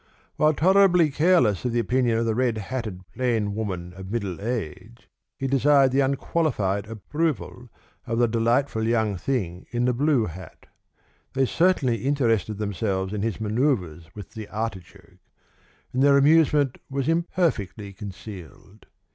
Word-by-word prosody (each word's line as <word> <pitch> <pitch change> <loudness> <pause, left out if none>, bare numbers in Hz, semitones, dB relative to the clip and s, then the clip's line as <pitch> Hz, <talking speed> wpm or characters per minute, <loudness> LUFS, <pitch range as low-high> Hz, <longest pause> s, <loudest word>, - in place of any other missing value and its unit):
While 155 0 +3
tolerably 180 -2 +4
careless 155 - +3
of 125 -2 -1
the 120 - +1
opinion 120 -1 +1
of 115 - 0
the 115 - +1
red 120 -1 0
hatted 105 -4 -5
plain 115 -4 0
woman 90 -5 -4
of 95 0 -9
middle 100 -5 -3
age, 105 - -5 0.3
he 135 - -4
desired 135 0 +4
the 135 - +1
unqualified 135 - 0
approval 125 - -3 0.4
of 115 - -1
the 120 0 +3
delightful 115 +2 +1
young 110 -3 +1
thing 95 -4 -3
in 120 0 -1
the 125 - +2
blue 135 -2 +2
hat. 90 -1 -10 0.7
They 135 0 +2
certainly 150 -6 +2
interested 115 -6 0
themselves 100 -1 -2
in 105 - -3
his 115 0 -2
manoeuvres 105 - -1
with 105 -3 -9
the 110 -2 -8
artichoke, 105 -5 -7 0.7
and 130 - 0
their 140 0 +6
amusement 145 -2 +3
was 135 -1 -2
imperfectly 160 - -1
concealed. 100 - -11
115 Hz, 140 wpm, -24 LUFS, 100-140 Hz, 0.7 s, their